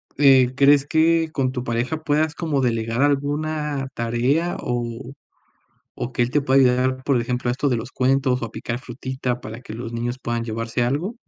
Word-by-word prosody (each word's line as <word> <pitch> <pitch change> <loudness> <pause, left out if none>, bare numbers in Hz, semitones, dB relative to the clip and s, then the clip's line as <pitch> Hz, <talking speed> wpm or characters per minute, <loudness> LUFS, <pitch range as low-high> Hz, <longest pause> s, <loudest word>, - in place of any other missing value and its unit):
eh, 130 -3 +5
¿crees 140 0 +5
que 160 +1 +3
con 130 -4 0
tu 125 -2 -4
pareja 120 +5 -1
puedas 155 +1 +1
como 150 -4 -1
delegar 115 0 0
alguna 145 0 0
tarea 125 +9 0
o 120 0 -4 0.9
o 125 - -4
que - - -3
él 120 +1 +2
te 145 0 +1
pueda 135 0 +4
ayudar, 130 0 +2
por 135 -4 +2
ejemplo, 125 +1 -2
a - - +2
esto 135 +2 0
de 120 - +2
los 115 +3 -7
cuentos 130 -1 +1
o - - 0
a 115 - -6
picar 120 +2 -4
frutita 130 0 -4
para 110 +4 -8
que - - -9
los 115 +1 -6
niños 120 +2 -3
puedan 120 0 -2
llevarse 115 +1 -2
algo? 150 - -1
130 Hz, 190 wpm, -22 LUFS, 120-145 Hz, 0.9 s, eh